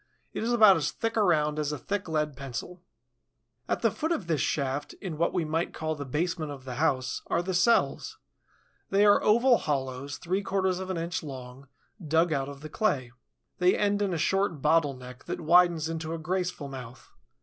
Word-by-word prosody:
It -, -, -3 dB
is 230 Hz, +2 st, 0 dB
about 215 Hz, -6 st, +7 dB
as 150 Hz, -2 st, 0 dB
thick 225 Hz, +9 st, -3 dB
around 155 Hz, -8 st, +2 dB
as 150 Hz, -1 st, -1 dB
a 150 Hz, -, -3 dB
thick 200 Hz, +7 st, -3 dB
lead 150 Hz, -2 st, -1 dB
pencil. 140 Hz, +6 st, -7 dB, 0.9 s
At -, -, -1 dB
the -, -, +4 dB
foot 320 Hz, +2 st, -3 dB
of 225 Hz, -, -1 dB
this 160 Hz, -5 st, 0 dB
shaft, 140 Hz, -1 st, -1 dB
in 180 Hz, -6 st, -6 dB
what 170 Hz, -, +2 dB
we 175 Hz, -3 st, -1 dB
might 165 Hz, +2 st, -2 dB
call 155 Hz, 0 st, -2 dB
the 145 Hz, -2 st, -6 dB
basement 155 Hz, +2 st, -2 dB
of 135 Hz, -2 st, -9 dB
the 125 Hz, -2 st, -6 dB
house, 130 Hz, -5 st, 0 dB
are 170 Hz, -, 0 dB
the 185 Hz, +1 st, -3 dB
cells. 180 Hz, +6 st, +2 dB, 0.7 s
They 200 Hz, +1 st, +4 dB
are 205 Hz, -, +6 dB
oval 235 Hz, +3 st, +4 dB
hollows, 135 Hz, -1 st, -3 dB
three 185 Hz, +4 st, -1 dB
quarters 190 Hz, -2 st, 0 dB
of 190 Hz, 0 st, -6 dB
an 185 Hz, -, -2 dB
inch 170 Hz, +1 st, -3 dB
long, 130 Hz, -2 st, -9 dB, 0.4 s
dug 160 Hz, +2 st, +2 dB
out 135 Hz, -1 st, -1 dB
of 140 Hz, 0 st, -10 dB
the 155 Hz, -, -7 dB
clay. 140 Hz, -, 0 dB, 0.5 s
They 180 Hz, 0 st, +4 dB
end 205 Hz, 0 st, +1 dB
in 200 Hz, -2 st, +1 dB
a 170 Hz, -, -1 dB
short 190 Hz, 0 st, +1 dB
bottle 150 Hz, -1 st, +2 dB
neck 125 Hz, 0 st, -12 dB
that -, -, -4 dB
widens 170 Hz, -1 st, +4 dB
into 160 Hz, 0 st, -4 dB
a -, -, -4 dB
graceful 180 Hz, -2 st, -3 dB
mouth. 130 Hz, -2 st, -10 dB
160 Hz, 200 wpm, -28 LUFS, 145-185 Hz, 0.9 s, about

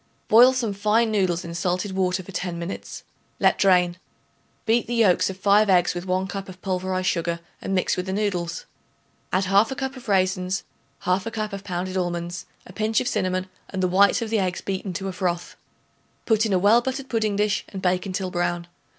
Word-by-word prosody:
Boil 245 Hz, +4 st, +8 dB
some 240 Hz, -5 st, -1 dB
fine 215 Hz, +3 st, +2 dB
noodles 185 Hz, -5 st, 0 dB
in 170 Hz, -, -6 dB
salted 180 Hz, +3 st, -1 dB
water 185 Hz, 0 st, 0 dB
for 195 Hz, -, -11 dB
ten 180 Hz, -2 st, -3 dB
minutes; 170 Hz, +3 st, -6 dB, 0.4 s
let -, -, +3 dB
drain. 180 Hz, -2 st, +4 dB, 0.7 s
Beat 230 Hz, +2 st, +2 dB
the 240 Hz, -, -2 dB
yolks 205 Hz, -7 st, +4 dB
of 190 Hz, -, -6 dB
5 205 Hz, +2 st, +4 dB
eggs 180 Hz, -2 st, +4 dB
with 175 Hz, +1 st, -6 dB
1 185 Hz, +1 st, 0 dB
cup 195 Hz, 0 st, -6 dB
of 185 Hz, 0 st, -11 dB
pulverized 185 Hz, -1 st, -1 dB
sugar 170 Hz, -1 st, 0 dB, 0.2 s
and 195 Hz, -, -2 dB
mix 185 Hz, -, +1 dB
with 180 Hz, +1 st, -4 dB
the -, -, -2 dB
noodles. 190 Hz, -, -2 dB, 0.7 s
Add 185 Hz, -, +2 dB
1/2 200 Hz, +7 st, +3 dB
cup 265 Hz, -1 st, -3 dB
of 255 Hz, -2 st, -12 dB
raisins, 185 Hz, -1 st, +1 dB, 0.4 s
1/2 190 Hz, +4 st, 0 dB
cup 215 Hz, -2 st, -3 dB
of 195 Hz, 0 st, -6 dB
pounded 185 Hz, -1 st, -3 dB
almonds, 175 Hz, -1 st, -3 dB, 0.2 s
a 180 Hz, -, -13 dB
pinch 215 Hz, +2 st, +1 dB
of 250 Hz, -, -2 dB
cinnamon 185 Hz, -4 st, -1 dB, 0.2 s
and 190 Hz, -1 st, -3 dB
the -, -, +3 dB
whites 200 Hz, +5 st, +4 dB
of 225 Hz, -, -6 dB
the 220 Hz, -, +2 dB
eggs 185 Hz, -2 st, -1 dB
beaten 190 Hz, 0 st, -3 dB
to 195 Hz, +2 st, -4 dB
a 190 Hz, -, -4 dB
froth. 175 Hz, -2 st, -2 dB, 0.7 s
Put 220 Hz, -1 st, +3 dB
in 205 Hz, -, -1 dB
a -, -, +4 dB
well 205 Hz, +6 st, +5 dB
buttered 265 Hz, +2 st, -4 dB
pudding 220 Hz, -4 st, 0 dB
dish 210 Hz, 0 st, +1 dB
and 195 Hz, -, -6 dB
bake 185 Hz, +1 st, 0 dB
until 185 Hz, -1 st, -3 dB
brown. 175 Hz, -1 st, -1 dB
190 Hz, 200 wpm, -24 LUFS, 180-210 Hz, 0.7 s, Boil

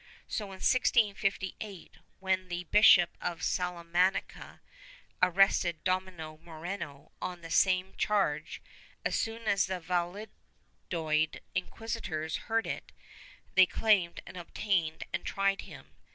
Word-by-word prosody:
So, 215 Hz, -, -3 dB
in 195 Hz, -1 st, -9 dB
1658, 200 Hz, -5 st, +1 dB, 0.2 s
when 190 Hz, -1 st, 0 dB
the 175 Hz, 0 st, -4 dB
Bishop 180 Hz, -1 st, +6 dB
of 175 Hz, 0 st, -3 dB
Salamanca 180 Hz, +1 st, -1 dB, 0.6 s
arrested 180 Hz, -2 st, +3 dB
Domingo 185 Hz, -4 st, -2 dB
Moreno 160 Hz, -3 st, -7 dB
on 180 Hz, -1 st, -4 dB
the 165 Hz, -1 st, -9 dB
same 185 Hz, +1 st, +3 dB
charge, 155 Hz, -8 st, 0 dB, 0.4 s
as -, -, +1 dB
soon 225 Hz, +1 st, -2 dB
as 200 Hz, -3 st, +2 dB
the 185 Hz, -1 st, -3 dB
Valladolid 170 Hz, -3 st, -3 dB
inquisitors 185 Hz, -5 st, -3 dB
heard 225 Hz, 0 st, +2 dB
of -, -, -1 dB
it, -, -, -11 dB, 0.6 s
they 190 Hz, -1 st, +7 dB
claimed 195 Hz, -5 st, +2 dB
and -, -, -10 dB
obtained 175 Hz, -2 st, -1 dB
and -, -, -1 dB
tried 195 Hz, 0 st, 0 dB
him. -, -, -13 dB
185 Hz, 115 wpm, -31 LUFS, 170-195 Hz, 0.6 s, they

